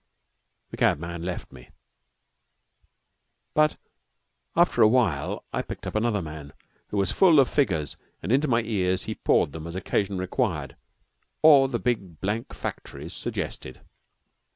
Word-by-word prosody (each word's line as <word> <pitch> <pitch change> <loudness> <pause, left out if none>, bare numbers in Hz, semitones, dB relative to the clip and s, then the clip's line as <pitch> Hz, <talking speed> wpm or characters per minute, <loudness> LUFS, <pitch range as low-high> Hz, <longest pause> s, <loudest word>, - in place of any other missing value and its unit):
The - - -7
cabman 85 +2 0
left 90 +1 -5
me; 60 - -14 1.8
but 155 0 +3 0.8
after - - +3
awhile 110 - +2
I - - 0
picked - - -8
up - - -4
another 110 -3 0
man, 75 -2 -8 0.3
who 105 - -4
was 100 -1 +2
full 170 -6 +5
of 135 - +5
figures, 80 - 0 0.3
and 95 - -2
into 140 +4 +3
my 120 -3 +2
ears 95 -5 0
he - - -3
poured - - +2
them 80 +2 -7
as 85 - -7
occasion 95 +1 -1
required 90 - -2 0.7
or 145 -4 +8
the 125 -3 -2
big 100 -10 -2
blank 105 +4 -2
factories 75 +4 -6
suggested. 65 - -5
95 Hz, 135 wpm, -26 LUFS, 80-120 Hz, 1.8 s, or